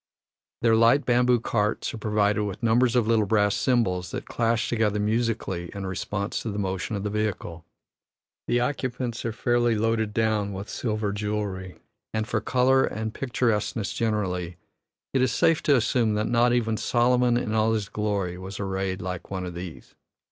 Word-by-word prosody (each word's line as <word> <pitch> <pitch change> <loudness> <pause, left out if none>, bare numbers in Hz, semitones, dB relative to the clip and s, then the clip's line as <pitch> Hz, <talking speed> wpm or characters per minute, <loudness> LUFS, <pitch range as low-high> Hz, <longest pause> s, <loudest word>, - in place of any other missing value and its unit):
Their 115 -1 +5
light 115 +6 +4
bamboo 125 0 +3
carts 105 -1 -1
are - - -5
provided 105 -1 +1
with 100 +2 -5
numbers 115 +1 +3
of 120 -3 +3
little 110 -2 +2
brass 105 -1 +3
cymbals 95 -9 +1
that - - -5
clash 115 -1 0
together 110 -3 +1
musically 105 -5 -1
in 100 -1 -4
response 100 +2 -3
to 115 - -4
the 100 - -4
motion 95 +1 -2
of 100 - -3
the 105 - -2
vehicle; 100 -6 -3 0.8
the 120 - +2
occupants 125 -2 -2
are 115 - 0
fairly 120 +1 +1
loaded 110 0 0
down 105 -2 0
with 95 +2 -6
silver 110 -3 -2
jewellery, 100 -3 -3 0.4
and 110 0 -1
for - - -1
color 130 +1 +3
and 110 +1 -3
picturesqueness 115 -4 -1
generally 90 -6 -1 0.6
it 135 - +2
is 130 -2 +2
safe 160 +6 +3
to 145 - +4
assume 115 -2 +2
that 105 +1 0
"not 120 0 +3
even 115 -2 +1
Solomon 120 +1 +2
in 115 -3 -2
all 110 0 +2
his 105 -3 -1
glory 100 -5 -2
was 95 +1 -7
arrayed 95 -1 -2
like 90 -1 -5
one 95 -1 -3
of 90 - -6
these." 85 -1 -8
110 Hz, 170 wpm, -26 LUFS, 100-120 Hz, 0.8 s, Their